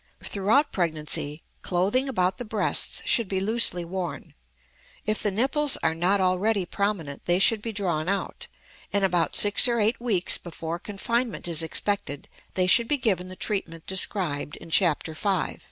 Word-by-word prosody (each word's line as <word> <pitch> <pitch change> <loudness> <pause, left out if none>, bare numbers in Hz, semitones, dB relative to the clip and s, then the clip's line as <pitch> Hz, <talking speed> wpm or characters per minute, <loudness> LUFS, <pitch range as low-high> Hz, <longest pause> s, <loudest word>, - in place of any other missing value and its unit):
Throughout 215 +9 +1
pregnancy 155 -3 -1 0.2
clothing 200 +10 0
about 185 -6 0
the - - -3
breasts 215 -2 +1
should 230 -4 +1
be 190 0 -2
loosely 195 -4 +2
worn. 180 0 -6 0.7
If 215 0 +1
the 210 - +2
nipples 270 +8 +2
are 160 - +2
not 180 +5 +2
already 190 +2 +1
prominent 175 -8 -3
they 175 0 +3
should 210 +3 +3
be 230 - -4
drawn 180 -6 -2
out; 200 0 -3 0.4
and 200 -1 +2
about 175 -3 0
six 205 +4 +5
or 235 -1 0
eight 220 +3 +1
weeks 205 -7 +2
before 170 -1 -6
confinement 230 +3 -3
is 165 -2 0
expected 165 -1 -2 0.3
they 185 - +2
should 230 +6 +4
be 295 - +1
given 190 -8 -1
the 185 - -9
treatment 175 -6 -2
described 180 -6 -1
in 165 - -13
Chapter 165 -3 +1
V. 195 +4 -2
190 Hz, 160 wpm, -25 LUFS, 175-215 Hz, 0.7 s, six